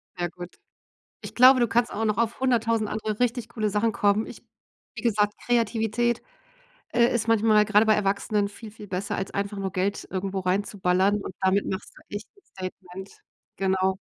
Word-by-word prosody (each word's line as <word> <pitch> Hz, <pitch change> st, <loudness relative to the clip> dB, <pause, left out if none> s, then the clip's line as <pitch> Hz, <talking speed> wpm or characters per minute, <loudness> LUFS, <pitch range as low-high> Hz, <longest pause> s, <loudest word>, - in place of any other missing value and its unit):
Ja 175 Hz, -1 st, -1 dB
gut. 175 Hz, +1 st, -10 dB, 0.7 s
Ich -, -, -9 dB
glaube, 255 Hz, +1 st, +7 dB
du 240 Hz, -, +3 dB
kannst 240 Hz, +2 st, +1 dB
auch 220 Hz, -, -2 dB
noch 215 Hz, -1 st, 0 dB
auf 230 Hz, +1 st, 0 dB
100.000 230 Hz, -4 st, +1 dB
andere 215 Hz, 0 st, -3 dB
richtig 245 Hz, -1 st, 0 dB
coole 215 Hz, -2 st, -2 dB
Sachen 210 Hz, +3 st, +1 dB
kommen. 205 Hz, +1 st, +2 dB
Ich -, -, -11 dB, 0.5 s
wie -, -, -6 dB
gesagt, 210 Hz, -3 st, +1 dB
Kreativität, 235 Hz, 0 st, +1 dB, 0.7 s
äh, 235 Hz, 0 st, +4 dB
ist 225 Hz, -1 st, -1 dB
manchmal 215 Hz, -1 st, +4 dB
gerade 215 Hz, +1 st, +4 dB
bei 215 Hz, -, +5 dB
Erwachsenen 205 Hz, 0 st, 0 dB
viel, 215 Hz, +2 st, -11 dB
viel 210 Hz, 0 st, -12 dB
besser, 190 Hz, +1 st, -3 dB
als 190 Hz, -, -4 dB
einfach 200 Hz, +1 st, -3 dB
nur 195 Hz, -1 st, -3 dB
Geld 190 Hz, +3 st, -2 dB
irgendwo 190 Hz, 0 st, -3 dB
reinzuballern, 190 Hz, +1 st, +1 dB
und -, -, -7 dB
damit 190 Hz, +1 st, +2 dB
machst 190 Hz, -, -5 dB
du -, -, -16 dB
echt 205 Hz, +4 st, -6 dB
'n 400 Hz, -, -24 dB
Statement, 185 Hz, 0 st, -9 dB, 0.5 s
genau. 190 Hz, 0 st, +1 dB
210 Hz, 180 wpm, -25 LUFS, 195-225 Hz, 0.7 s, glaube